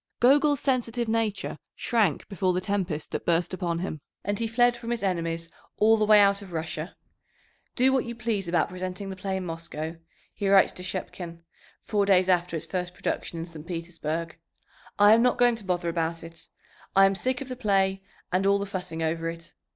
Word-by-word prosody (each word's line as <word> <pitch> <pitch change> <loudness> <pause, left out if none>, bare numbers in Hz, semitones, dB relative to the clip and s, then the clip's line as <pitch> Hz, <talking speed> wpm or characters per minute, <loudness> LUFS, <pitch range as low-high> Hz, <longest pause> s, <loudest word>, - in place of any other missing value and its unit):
Gogol's 285 +3 +5
sensitive 240 -3 0
nature 220 -2 -1 0.2
shrank 215 - +1
before 185 -2 0
the 180 - +1
tempest 185 -5 -2
that - - -3
burst 170 +2 +1
upon 175 -3 -1
him, 170 -4 -4 0.2
and 205 +1 -1
he 230 - 0
fled 240 +2 +3
from 235 -1 -7
his 235 -3 -2
enemies 165 -3 -1 0.3
all 220 +1 +5
the 215 -1 +1
way 210 -1 +8
out 200 0 +4
of 190 -3 -11
Russia. 160 +1 -4 0.8
"Do 260 +2 +4
what 265 - +2
you 235 0 -5
please 215 -5 -2
about 170 -1 +1
presenting 185 +2 -5
the - - -6
play 190 0 -3
in 185 - -4
Moscow," 165 -1 -5 0.4
he 200 -2 -1
writes 195 -1 +6
to - - -9
Shchepkin 180 -2 -6 0.4
four 205 -2 +1
days 185 -2 +5
after 175 -1 +2
its 160 - -4
first 180 -1 -4
production 170 - -3
in 165 - -4
St. 165 -2 -11
Petersburg. 165 -1 -4 0.6
"I 205 +1 +7
am 230 - +5
not 250 0 +3
going 245 -1 +4
to 220 - -9
bother 175 -2 -1
about 165 0 -2
it. 165 0 -11 0.5
I 195 0 +8
am 195 - +3
sick 250 +6 -1
of 275 - -6
the 255 - -5
play 195 -5 +1 0.3
and 185 +2 +2
all 200 0 +5
the 200 - -2
fussing 180 -5 -4
over 165 +1 -1
it. 165 0 -9
190 Hz, 200 wpm, -27 LUFS, 170-215 Hz, 0.8 s, way